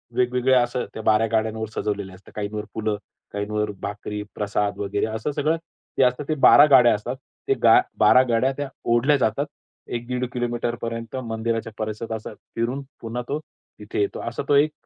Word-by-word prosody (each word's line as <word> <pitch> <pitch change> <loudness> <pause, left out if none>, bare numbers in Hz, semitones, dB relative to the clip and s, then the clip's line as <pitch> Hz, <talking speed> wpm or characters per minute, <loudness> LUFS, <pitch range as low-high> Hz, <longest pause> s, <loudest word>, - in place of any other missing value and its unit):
वेगवेगळ्या 125 +1 +3
असं 120 +1 -2
त्या 110 - -6
12 110 +1 +4
गाड्यांवर 110 0 0
सजवलेले 100 -2 -2
असतात. 95 +1 -16
काहींवर 105 0 -3
फुलं, 110 -1 -1 0.4
काहींवर 105 +1 -1
भाकरी, 105 +1 -4
प्रसाद 105 0 -1
वगैरे 100 0 -1
असं 110 +6 -3
सगळं 150 +3 +1 0.4
ते - - +5
असतात 125 +3 +1
ते 155 - +2
12 145 - +9
गाड्या 125 -3 +8
असतात. 120 +5 -4 0.3
ते 405 - +4
गा 375 - +8 0.2
12 130 - +7
गाड्या 120 +3 +3
त्या 145 -1 -3 0.2
ओढल्या 135 +5 +4
जातात. 130 +2 +1 0.4
1 120 0 -4
दीड 125 0 -1
किलोमीटर 120 -1 -1
पर 115 0 -2 0.2
मंदिराच्या 115 0 -2
परिसरात 110 +1 -4 0.3
फिरून 120 +4 -1 0.2
पुन्हा 115 +2 -4
तो 145 +2 -1 0.4
तिथे 105 0 -4
येतो. 100 - -1
असा 115 - -4
तो 145 - +5
एक 150 +2 +4
115 Hz, 170 wpm, -24 LUFS, 105-125 Hz, 0.4 s, 12